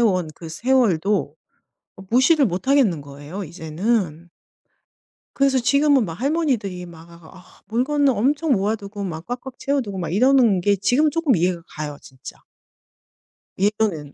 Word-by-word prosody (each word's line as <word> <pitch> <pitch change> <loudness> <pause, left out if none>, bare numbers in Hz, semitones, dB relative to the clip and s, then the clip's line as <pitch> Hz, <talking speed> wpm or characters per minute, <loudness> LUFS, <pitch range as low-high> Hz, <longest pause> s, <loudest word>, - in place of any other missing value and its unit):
온 185 -8 +2
그 165 - -10
세월도 210 -1 +1 0.6
어 195 - -11
무시를 265 +3 +4
못 180 +3 -4
하겠는 250 - +3
거예요 145 +7 -8
이제는. 170 +1 -2 1.1
그래서 275 -1 +2
지금은 280 0 +3
막 165 - -6
할머니들이 240 - -1
막 165 -1 -13
아 170 +2 -15 0.2
물건을 275 +5 +1
엄청 285 +8 0
모아 205 +1 +1
두고 205 -1 -8
막 165 -3 -6
꽉꽉 250 +2 -7
채워 280 0 0
두고 200 -4 -6
막 170 -3 -3
이러는 240 -3 +4
게 205 +3 +2
지금은 245 +11 +2
쪼끔 320 -6 +2
이해가 175 0 0
가요, 150 -1 -5
진짜. 130 -1 -12 1.2
예전엔 200 -8 0
205 Hz, 295 characters per minute, -21 LUFS, 170-260 Hz, 1.2 s, 무시를